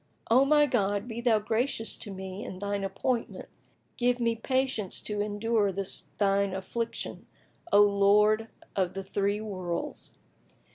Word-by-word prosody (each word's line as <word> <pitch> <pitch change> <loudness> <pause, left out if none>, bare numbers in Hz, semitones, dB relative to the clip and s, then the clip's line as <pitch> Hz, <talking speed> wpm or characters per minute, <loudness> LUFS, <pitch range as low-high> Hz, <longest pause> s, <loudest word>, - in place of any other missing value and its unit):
O 260 +4 +6
my 295 +1 +5
God, 205 -5 0
be 235 0 -5
Thou 235 -3 +4
gracious 225 +2 -1
to 215 - -7
me 190 +1 -6
in 185 - -7
Thine 200 0 -2
appointment 235 +4 -2
and - - -33
give 245 0 +2
me 230 -1 +1
patience 260 -4 -1
to 210 -1 -2
endure 210 0 +1
this 195 0 -2
Thine 200 -1 +2
affliction, 230 +5 -5 0.4
O 205 - +7
Lord 210 +2 +4 0.3
of 185 -2 0
the 195 - -4
three 200 +2 -1
Worlds!" 185 -5 -5
210 Hz, 145 wpm, -29 LUFS, 195-230 Hz, 0.4 s, O